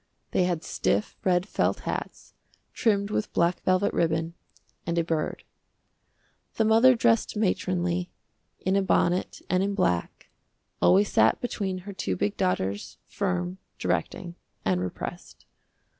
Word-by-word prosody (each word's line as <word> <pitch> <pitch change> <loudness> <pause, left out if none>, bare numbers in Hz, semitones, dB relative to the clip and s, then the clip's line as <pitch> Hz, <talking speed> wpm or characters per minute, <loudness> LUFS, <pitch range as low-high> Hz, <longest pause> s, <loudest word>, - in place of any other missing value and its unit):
They 180 - +2
had 175 -3 -1
stiff, 100 +1 -1
red 180 0 +2
felt - - 0
hats, - - -5 0.4
trimmed 200 -2 +1
with 215 - -1
black 170 +1 +2
velvet 185 +2 +2
ribbon, 165 0 0 0.5
and 170 0 -2
a 170 - +3
bird. 160 -2 -2 1.1
The 225 - +2
mother 230 +4 +6
dressed 230 -2 +2
matronly, 180 -3 0 0.5
in 190 +1 0
a 200 - +4
bonnet 180 -1 +1
and 185 0 +2
in 200 +1 0
black, 90 - -1 0.5
always 200 +2 +5
sat - - +4
between 200 -6 -2
her 200 - -6
two 95 - -2
big 100 - 0
daughters, 95 +2 -1
firm, 90 +1 -2 0.2
directing, 175 -1 -2 0.3
and 90 -1 +1
repressed. 90 - -6
180 Hz, 130 wpm, -27 LUFS, 160-200 Hz, 1.1 s, mother